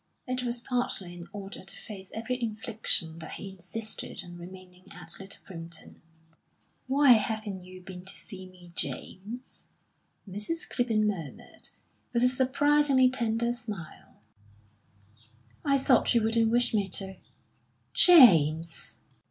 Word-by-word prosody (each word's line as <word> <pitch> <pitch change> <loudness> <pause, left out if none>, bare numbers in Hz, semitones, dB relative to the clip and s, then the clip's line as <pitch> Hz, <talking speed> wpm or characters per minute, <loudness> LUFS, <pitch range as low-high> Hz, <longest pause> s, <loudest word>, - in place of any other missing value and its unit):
It 255 0 -2
was 240 -1 -3
partly 240 -8 -2
in 175 -1 -9
order 200 -2 -7
to 195 - -6
face 195 -3 -9
every 245 +3 -3
infliction 215 -7 -2
that 160 - -7
he 195 - -6
insisted 190 +2 -5
on 175 0 -10
remaining 180 +1 -12
at - - -7
Little 195 0 -9
Primpton. 165 -3 -10 0.9
"Why 275 0 +5
haven't 215 -4 +1
you 185 0 -11
been 180 -1 -9
to 190 - -9
see 185 -2 -8
me, 180 -1 -16
James?" 225 +10 -6 0.6
Mrs. 210 - -4
Clibborn 225 -4 +1
murmured, 175 -9 -5 0.4
with 235 0 +2
a 250 - +6
surprisingly 265 0 +3
tender 235 -1 0
smile. 210 - -9 1.4
"I 275 -2 +3
thought 265 -2 +3
you 230 - +4
wouldn't 225 0 +3
wish 240 +1 +2
me 200 -3 +1
to." 190 0 -1 0.8
"James!" 165 - +6
210 Hz, 125 wpm, -29 LUFS, 185-245 Hz, 1.4 s, a